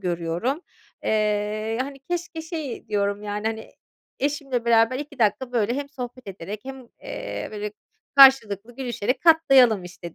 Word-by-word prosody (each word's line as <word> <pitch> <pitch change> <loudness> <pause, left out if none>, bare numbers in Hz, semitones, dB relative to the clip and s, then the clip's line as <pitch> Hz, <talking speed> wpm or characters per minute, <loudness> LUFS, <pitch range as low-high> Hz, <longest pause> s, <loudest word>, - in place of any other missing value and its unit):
görüyorum. 175 - -2 0.4
Eee, 215 +1 0
hani, 275 +1 -4
keşke 345 -2 -3
şey 315 -6 -6
diyorum 205 0 -1
yani, 210 +1 -3
hani, 220 0 -4 0.5
eşimle 275 -4 -1
beraber 230 +2 +4
2 285 -2 -8
dakika 240 +4 +1
böyle 235 0 +1
hem 280 0 -4
sohbet 250 -3 -8
ederek 195 +3 -7
hem, 265 -2 -9
eee, - - -5
böyle, 210 0 -4 0.4
karşılıklı 240 -5 +6
gülüşerek 250 -1 -2
katlayalım, 270 - +5
işte, 175 -1 -10
235 Hz, 135 wpm, -24 LUFS, 210-275 Hz, 0.5 s, karşılıklı